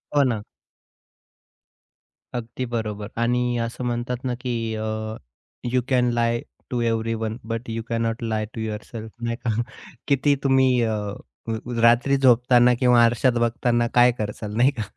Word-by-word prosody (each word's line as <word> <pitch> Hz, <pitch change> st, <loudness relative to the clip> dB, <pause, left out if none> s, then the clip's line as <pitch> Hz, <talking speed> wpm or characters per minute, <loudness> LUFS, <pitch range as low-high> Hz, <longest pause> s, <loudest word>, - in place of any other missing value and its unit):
हो, 145 Hz, -, +6 dB
ना. 120 Hz, -5 st, 0 dB, 1.9 s
अगदी 120 Hz, +1 st, -4 dB
बरोबर. 110 Hz, -3 st, -3 dB
आणि 120 Hz, +1 st, +1 dB
असं 115 Hz, +2 st, -3 dB
म्हणतात 120 Hz, +1 st, -2 dB
ना, 130 Hz, -1 st, -1 dB
की 115 Hz, -3 st, -2 dB
अ, 110 Hz, 0 st, -3 dB, 0.9 s
you 130 Hz, -, +3 dB
can 125 Hz, -2 st, +3 dB
lie 120 Hz, 0 st, +1 dB, 0.3 s
to 125 Hz, -, -1 dB
everyone 115 Hz, -1 st, -1 dB
but 115 Hz, +1 st, -4 dB
you 115 Hz, 0 st, -3 dB
can 115 Hz, -1 st, 0 dB
not 115 Hz, +1 st, -2 dB
lie 110 Hz, -2 st, -1 dB
to 115 Hz, -, -5 dB
yourself 110 Hz, +1 st, -6 dB
नाही 115 Hz, 0 st, -1 dB
का? -, -, +1 dB, 0.6 s
किती 140 Hz, 0 st, +3 dB
तुम्ही 130 Hz, -2 st, +4 dB
अ, 110 Hz, -1 st, 0 dB, 0.5 s
अ, -, -, -1 dB, 0.3 s
रात्री 120 Hz, +4 st, +4 dB
झोपताना 125 Hz, -1 st, +5 dB
किंवा 125 Hz, -2 st, +5 dB
आरशात 120 Hz, +2 st, +3 dB
बघताना 120 Hz, 0 st, +1 dB
काय 125 Hz, 0 st, +6 dB
करसाल 105 Hz, 0 st, -4 dB
नाही 125 Hz, +4 st, +5 dB
का, 120 Hz, -6 st, -4 dB
120 Hz, 150 wpm, -23 LUFS, 115-125 Hz, 1.9 s, हो